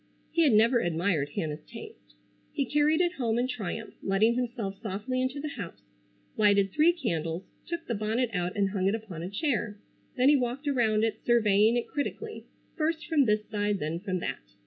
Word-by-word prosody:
He 335 - +2
had 285 -7 +4
never 230 +3 +5
admired 170 -5 0
Hannah's 155 -1 -3
taste. - - -12 0.4
He - - -1
carried 300 +2 +3
it 350 0 +1
home 230 -2 +1
in 245 +1 +1
triumph, 225 -2 -5
letting 205 +4 +3
himself 235 -5 -3
softly 220 +4 -2
into 260 +2 -2
the 300 +1 -3
house, 200 -11 -8 0.5
lighted 200 -2 +4
three 310 - +5
candles, 170 - -2 0.2
took 340 -1 -4
the 235 - -2
bonnet 225 +3 0
out 180 -1 -1
and 195 -1 +2
hung 190 -2 0
it 200 - +2
upon 205 -7 -7
a 175 - -4
chair. 210 -2 -1 0.4
Then 255 +1 +4
he 295 - +6
walked 255 +2 -1
around 225 -6 +2
it 220 -1 0
surveying 220 -1 +4
it 240 - -2
critically, 435 +10 -4 0.3
first 320 0 -1
from 300 -3 +3
this 210 -1 +1
side, 205 -1 0
then 160 0 -3
from 185 -1 -2
that. - - -3
220 Hz, 190 wpm, -28 LUFS, 195-260 Hz, 0.5 s, he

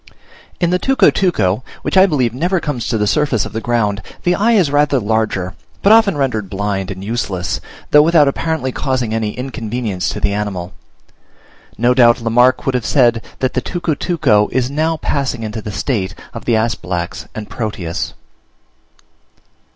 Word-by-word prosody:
In 175 -1 +1
the 180 - +2
tucutuco, 180 - +2 0.2
which - - -2
I 190 +1 +7
believe 130 - 0
never 175 +8 0
comes 145 -8 -3
to 115 - 0
the 105 - +1
surface 135 -2 +1
of - - -8
the 110 - -3
ground, 105 -4 0 0.2
the 175 - +3
eye 220 +6 +2
is 180 -10 +3
rather 145 -1 +3
larger, 105 -4 -1 0.3
but 200 - +5
often 220 -7 +5
rendered 110 -8 -1
blind 95 -1 -2
and 95 -1 -6
useless, 100 -5 -2 0.3
though 150 - +8
without 155 -2 +4
apparently 140 -2 -1
causing 125 -4 -2
any 110 -1 -2
inconvenience 115 -6 -3
to - - -4
the 100 - 0
animal; 100 -3 -3 1.0
no 120 +3 +3
doubt 120 -2 +5
Lamarck 125 +2 +3
would 135 - +1
have 125 -2 0
said 120 -4 +3 0.2
that 130 -1 0
the 130 - 0
tucutuco 155 - +1
is 130 0 0
now 160 +2 0
passing 135 -6 -2
into 110 0 -4
the 105 - -6
state 100 -3 -2 0.2
of 115 - -8
the 120 - +2
Asphalax 95 -6 -2
and 105 -1 -6
Proteus. 95 -6 -4
120 Hz, 165 wpm, -17 LUFS, 105-145 Hz, 1.0 s, though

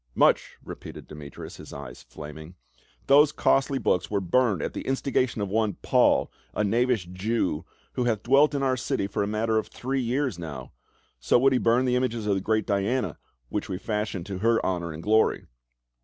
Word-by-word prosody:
" - - -36
Much - - +1
!" - - -30
repeated - - -9
Demetrius, 75 -2 -9
his - - -11
eyes - - -9
flaming, 75 +3 -10 0.2
" - - -33 0.2
those 145 +2 +6
costly 135 0 +2
books 90 -8 0
were 105 - 0
burned 100 +1 +2
at - - -3
the - - -4
instigation 130 -3 0
of 100 - -3
one 110 0 +1
Paul, - - +3 0.2
a - - +1
knavish 115 -1 +1
Jew, 90 -3 -2 0.3
who 125 - -1
hatli 110 -4 0
dwelt 140 +4 +4
in 140 - 0
our 130 -1 +2
city 130 -4 -1
for 100 - -2
a 100 - 0
matter 110 +1 +1
of - - -5
three 135 +1 -3
years 125 - -1
now. 75 -7 -7 0.5
So - - +3
would 135 +2 +4
he 125 - +3
burn 120 +3 +3
the 125 -1 +2
images 120 -3 -1
of 105 - +2
the 95 - -1
great 110 +2 0
Diana, 100 - -1 0.3
which 105 - -3
we 95 - -2
fashion 105 -3 -3
to 95 0 -6
her 115 +2 +2
honor 85 -3 -1
and 80 +1 -8
glory." 110 +1 +2
110 Hz, 200 wpm, -26 LUFS, 95-125 Hz, 0.5 s, those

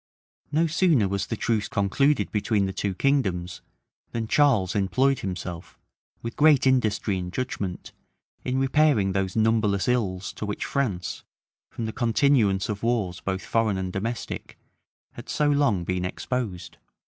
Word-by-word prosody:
No 160 +3 +3
sooner 165 - +3
was 100 0 -2
the 115 - -3
truce 110 -2 0
concluded 105 +4 +1
between 105 -1 +1
the 95 - -3
two 95 0 -2
kingdoms, 95 -9 0 0.5
than 115 -1 -2
Charles 115 -10 +3
employed 130 +7 +2
himself, 90 -5 -6 0.5
with 115 0 -5
great 150 -3 +5
industry 110 -6 +1
and 90 0 -5
judgment, 100 -6 -4 0.5
in 130 +1 -1
repairing 135 -6 +3
those 95 -1 -1
numberless 110 -3 +2
ills 100 -7 -1
to - - -5
which 105 - -3
France, 105 -11 -2 0.5
from 115 - -5
the 110 - -4
continuance 115 -5 +2
of 105 -1 -4
wars 110 -7 0
both 95 0 -3
foreign 110 -4 +1
and 95 -1 -3
domestic, 115 +4 -4 0.5
had - - -11
so 150 -1 +2
long 140 -11 +2
been 90 +1 -2
exposed. 95 -3 -4
110 Hz, 145 wpm, -25 LUFS, 95-130 Hz, 0.5 s, great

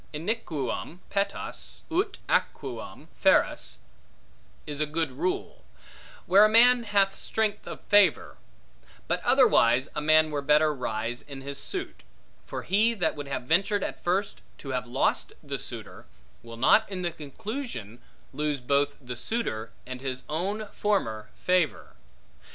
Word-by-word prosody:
Iniquum 165 - -3
petas 200 0 -3
ut 380 +6 0
aequum - - -2 0.2
feras - - +3 0.9
is 145 -1 -5
a 155 - +1
good 160 -1 -1
rule, 145 - -3 0.6
where 195 +3 +7
a 215 - +6
man 240 +2 +6
hath 200 -2 +2
strength 220 -2 -1
of - - -7
favor: 205 -5 +3 0.7
but - - 0
otherwise, 120 +5 +4
a 150 - -2
man 155 +1 +4
were 145 -1 -1
better 150 +2 +4
rise 120 -2 -3
in 140 -2 -10
his 140 0 -5
suit; - - -5 0.4
for - - -5
he, 220 +5 +3
that 195 - 0
would 145 -1 -6
have 135 -2 -3
ventured 195 +8 +2
at - - -5
first 190 +3 -1 0.2
to 135 - -9
have 125 -1 -2
lost 125 +3 0
the - - -4
suitor, - - -8 0.3
will 115 0 -10
not 215 - +4
in 185 -2 -4
the 175 - 0
conclusion 155 - -6 0.3
lose 150 -2 -1
both 140 +3 +1
the 125 -2 -7
suitor, 115 - -3
and 130 0 -7
his 130 -1 -3
own 195 +8 -2
former 110 - -1
favor. 180 -5 0
155 Hz, 140 wpm, -27 LUFS, 130-200 Hz, 0.9 s, where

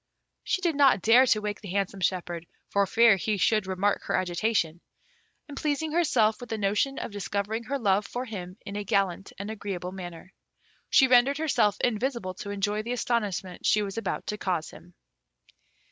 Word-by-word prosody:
She 375 - -1
did 340 -2 +2
not 275 -9 +4
dare 245 +4 +6
to 215 -3 +3
wake 210 0 -4
the 205 - -8
handsome 195 +1 -2
shepherd, 175 -2 -2 0.2
for 200 -1 +2
fear 225 0 +5
he 210 +3 -1
should 210 +1 +2
remark 190 +2 0
her - - 0
agitation; 175 -2 0 0.7
and 290 - -9
pleasing 300 +2 -1
herself 250 -11 +2
with 245 - -9
the 225 - -2
notion 210 +7 0
of - - -5
discovering 205 +3 -3
her 280 +3 -2
love 205 -4 +1
for 245 +1 -4
him 185 -5 -7
in 200 -1 -6
a 205 - -3
gallant 195 -1 0
and 200 +2 -5
agreeable 195 -4 -5
manner. 180 -1 -9 0.6
She 270 - +6
rendered 255 +2 +5
herself 215 -10 +2
invisible 235 -4 -1
to 200 - -6
enjoy 205 +1 -1
the 235 +3 -3
astonishment 210 -7 -2
she 210 - +3
was 195 -1 -5
about 200 - -3
to 210 - -4
cause 180 -6 -2
him. 175 0 -15
205 Hz, 180 wpm, -27 LUFS, 190-235 Hz, 0.7 s, dare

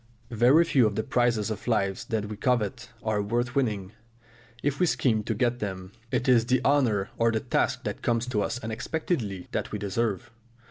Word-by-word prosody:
Very 125 +8 +5
few 130 -8 +4
of 105 - -3
the 110 - 0
prizes 115 -3 +1
of 110 - -6
life 100 -5 0
that 110 -2 -1
we 105 +1 -6
covet 115 0 -1
are 110 -1 0
worth 120 +4 -1
winning, 105 -9 -1 0.7
if 140 -1 0
we 180 - +3
scheme 115 -8 +2
to 110 - -1
get 120 +2 0
them; 95 -3 -5 0.2
it 125 - -1
is 120 -3 +4
the 130 0 +3
honour 120 -9 +2
or 115 0 +4
the 110 - 0
task - - 0
that - - -4
comes 115 0 +1
to 105 -4 0
us 115 - -2
unexpectedly 110 - -3
that - - -3
we - - -2
deserve. 110 +3 -2
115 Hz, 190 wpm, -27 LUFS, 105-125 Hz, 0.7 s, Very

